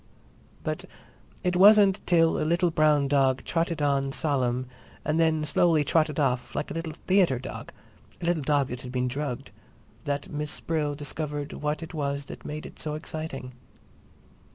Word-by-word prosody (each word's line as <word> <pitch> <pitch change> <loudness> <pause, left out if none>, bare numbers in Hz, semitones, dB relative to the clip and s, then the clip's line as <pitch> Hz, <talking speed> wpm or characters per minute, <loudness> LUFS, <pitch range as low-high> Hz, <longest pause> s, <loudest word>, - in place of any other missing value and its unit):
But - - -3 0.6
it 180 -1 +1
wasn't 200 +1 +7
till 165 -2 +4
a - - -1
little 170 +2 +2
brown 150 -3 +3
dog 135 -2 +2
trotted 165 -2 -1
on 135 -1 +1
solemn 130 -4 0 0.4
and 155 +2 +1
then 160 -2 +2
slowly 155 +1 +3
trotted 155 0 +1
off, 130 -3 0
like - - -2
a - - -3
little 165 -1 -4
"theatre" 185 -8 +4
dog, 130 - -7 0.5
a - - -5
little 170 -2 +1
dog 140 -1 +1
that 125 0 -5
had 125 - -8
been 125 0 0
drugged, 135 -1 -4 0.5
that 140 0 -2
Miss 150 0 -3
Brill 150 -3 -1
discovered 145 0 -4
what 150 +2 -2
it 165 - -9
was 140 -2 -2
that - - -10
made 155 +1 -6
it - - -11
so 150 -1 -3
exciting. 155 -4 -5
150 Hz, 165 wpm, -27 LUFS, 140-165 Hz, 0.6 s, wasn't